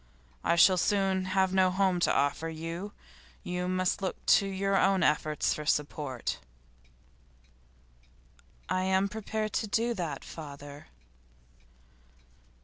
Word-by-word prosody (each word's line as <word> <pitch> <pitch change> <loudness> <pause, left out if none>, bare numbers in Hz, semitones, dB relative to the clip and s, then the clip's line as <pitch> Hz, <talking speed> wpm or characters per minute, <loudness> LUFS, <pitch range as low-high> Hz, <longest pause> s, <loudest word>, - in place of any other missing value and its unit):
I 170 - +2
shall 185 +2 +6
soon 195 -1 +1
have 190 0 +1
no 190 -1 +4
home 185 -1 +1
to - - +2
offer 145 +3 0
you; 165 +5 -6 0.5
you 180 0 -3
must 185 +1 0
look 190 - -4
to 200 - +5
your 195 0 -1
own 195 -1 +3
efforts 150 0 +1
for 150 - -5
support.' 145 -4 -2 2.3
'I 185 - 0
am 190 +1 +2
prepared 215 +1 -4
to 220 - -1
do 230 +3 0
that, 165 -9 -4
father. 145 -2 -10
185 Hz, 120 wpm, -29 LUFS, 160-195 Hz, 2.3 s, shall